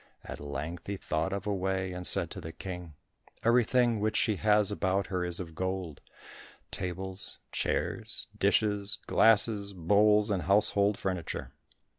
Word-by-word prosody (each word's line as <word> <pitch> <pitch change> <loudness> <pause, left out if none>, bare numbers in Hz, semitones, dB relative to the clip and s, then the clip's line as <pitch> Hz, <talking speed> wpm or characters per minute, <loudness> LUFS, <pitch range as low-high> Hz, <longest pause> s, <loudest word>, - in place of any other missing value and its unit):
At - - -7
length 75 +4 -6
he 100 0 -3
thought 80 +1 -2
of 100 0 -4
a 105 - 0
way, 95 -1 -2
and 90 0 0
said - - +5
to - - -6
the 80 - -7
King, 90 -3 -8 0.5
"Everything 120 0 +3
which 110 +1 0
she 105 -3 +1
has 105 0 +3
about 100 -1 0
her 90 -1 0
is 90 -1 +1
of 85 -3 -7
gold—tables, 95 +1 -6
chairs, - - -2
dishes, 105 -2 +1
glasses, 105 -2 +3
bowls, 105 +4 +3
and 95 -3 0
household 100 +1 +3
furniture. 95 -4 -4
95 Hz, 140 wpm, -30 LUFS, 90-105 Hz, 0.5 s, said